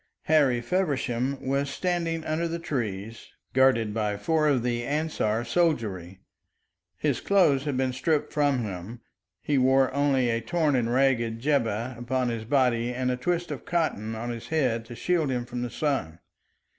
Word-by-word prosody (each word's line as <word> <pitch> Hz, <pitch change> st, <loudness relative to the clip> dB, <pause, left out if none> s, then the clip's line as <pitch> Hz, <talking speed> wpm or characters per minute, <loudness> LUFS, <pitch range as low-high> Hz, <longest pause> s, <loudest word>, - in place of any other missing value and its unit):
Harry 140 Hz, -6 st, +3 dB
Feversham 140 Hz, -4 st, -1 dB
was 140 Hz, +1 st, 0 dB
standing 165 Hz, 0 st, -2 dB
under 160 Hz, +2 st, -1 dB
the 165 Hz, 0 st, -3 dB
trees, 115 Hz, -, -4 dB, 0.3 s
guarded 125 Hz, -5 st, +3 dB
by 105 Hz, -2 st, -1 dB
four 155 Hz, +8 st, +1 dB
of 135 Hz, -5 st, +2 dB
the 120 Hz, -1 st, -1 dB
Ansar 140 Hz, -6 st, -1 dB
soldiery. 110 Hz, -, 0 dB, 0.8 s
His -, -, 0 dB
clothes 155 Hz, -9 st, +3 dB
had 140 Hz, -3 st, -1 dB
been 130 Hz, -1 st, 0 dB
stripped 150 Hz, +3 st, 0 dB
from 145 Hz, -4 st, +2 dB
him; 105 Hz, +4 st, -7 dB, 0.4 s
he 145 Hz, -3 st, +1 dB
wore 130 Hz, 0 st, +3 dB
only 135 Hz, -3 st, +2 dB
a 115 Hz, 0 st, -1 dB
torn 150 Hz, +4 st, +1 dB
and 120 Hz, -2 st, 0 dB
ragged 120 Hz, -3 st, +2 dB
jibbeh 120 Hz, -3 st, 0 dB
upon 125 Hz, +1 st, -1 dB
his 115 Hz, -2 st, -4 dB
body 125 Hz, -2 st, +2 dB
and 125 Hz, +1 st, -1 dB
a -, -, 0 dB
twist 175 Hz, +7 st, -2 dB
of -, -, -5 dB
cotton 135 Hz, -, -1 dB
on 120 Hz, +2 st, -4 dB
his 115 Hz, -1 st, -7 dB
head 125 Hz, -8 st, 0 dB
to 120 Hz, +1 st, -9 dB
shield 165 Hz, +1 st, 0 dB
him 125 Hz, -2 st, -1 dB
from 120 Hz, 0 st, -5 dB
the 125 Hz, -, -2 dB
sun. 125 Hz, -, -2 dB
130 Hz, 165 wpm, -26 LUFS, 115-150 Hz, 0.8 s, Harry